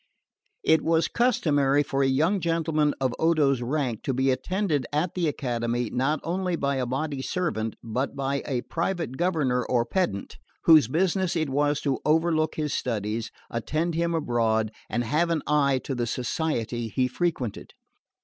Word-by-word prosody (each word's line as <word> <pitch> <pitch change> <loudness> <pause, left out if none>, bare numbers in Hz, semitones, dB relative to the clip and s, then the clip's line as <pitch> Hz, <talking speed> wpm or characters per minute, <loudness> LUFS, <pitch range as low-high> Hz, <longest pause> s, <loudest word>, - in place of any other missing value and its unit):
It 160 -1 +4
was 165 0 +2
customary 145 - +2
for 135 -1 -1
a 135 - +3
young 160 +9 +2
gentleman 160 -3 +1
of 130 -2 0
Odo's 150 -6 +3
rank 125 -3 -1
to 135 - 0
be 130 +1 +2
attended 150 - -1
at 155 +4 0
the 175 -3 0
Academy 120 -4 -2
not 135 +5 0
only 180 +1 -1
by 140 -3 -1
a 125 -2 -1
body 140 +2 -2
servant 130 - -2
but 125 +5 -2
by 140 0 -1
a 130 -4 -1
private 170 -5 -2
governor 150 -7 +1
or 120 -1 +1
pedant, 115 - -2 0.3
whose 155 -8 +7
business 180 - +1
it 155 -4 0
was 145 +1 +1
to 140 -3 0
overlook 160 0 +2
his 150 -2 -2
studies, 110 -1 -2 0.2
attend 155 +9 -1
him 170 +1 0
abroad, 115 -7 +1 0.2
and 120 +2 0
have 155 +8 +1
an 165 -3 0
eye 140 -3 +2
to 135 - -3
the 120 -2 -1
society 120 -2 -2
he 125 +4 0
frequented. 130 - -3
145 Hz, 160 wpm, -26 LUFS, 125-165 Hz, 0.3 s, whose